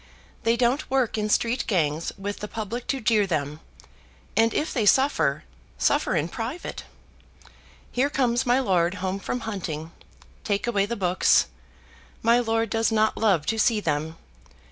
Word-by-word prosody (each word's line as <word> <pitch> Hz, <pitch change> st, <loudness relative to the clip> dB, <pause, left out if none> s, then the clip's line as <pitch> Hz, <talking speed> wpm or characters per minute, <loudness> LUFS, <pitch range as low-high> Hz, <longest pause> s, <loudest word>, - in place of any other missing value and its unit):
"They 230 Hz, +1 st, +3 dB
don't 250 Hz, +5 st, +1 dB
work 260 Hz, -3 st, +1 dB
in 215 Hz, -1 st, -1 dB
street 235 Hz, +3 st, +1 dB
gangs 160 Hz, -5 st, 0 dB
with 200 Hz, +1 st, -5 dB
the 210 Hz, -, -5 dB
public 225 Hz, +3 st, -5 dB
to 270 Hz, -, -1 dB
jeer 215 Hz, -2 st, +3 dB
them: 150 Hz, -3 st, -2 dB, 0.8 s
and 225 Hz, 0 st, +4 dB
if 305 Hz, -, -1 dB
they 220 Hz, -5 st, +1 dB
suffer, 270 Hz, +6 st, +3 dB, 0.3 s
suffer 290 Hz, -, +1 dB
in 150 Hz, -, +1 dB
private. 235 Hz, -, -6 dB, 1.1 s
Here 265 Hz, +3 st, +1 dB
comes 250 Hz, -3 st, +1 dB
my 250 Hz, 0 st, +3 dB
lord 180 Hz, -7 st, +1 dB
home 190 Hz, 0 st, -3 dB
from 245 Hz, +5 st, -4 dB
hunting. 165 Hz, -7 st, -5 dB, 0.5 s
Take 205 Hz, -1 st, -1 dB
away 205 Hz, -4 st, +1 dB
the 235 Hz, -, -3 dB
books. 185 Hz, -3 st, +3 dB, 0.8 s
My 235 Hz, +1 st, +5 dB
lord 225 Hz, -2 st, 0 dB
does 225 Hz, 0 st, +1 dB
not 220 Hz, 0 st, +2 dB
love 195 Hz, -9 st, +2 dB
to 225 Hz, +5 st, -1 dB
see 220 Hz, -1 st, +3 dB
them. 160 Hz, -2 st, -2 dB
220 Hz, 155 wpm, -25 LUFS, 190-240 Hz, 1.1 s, My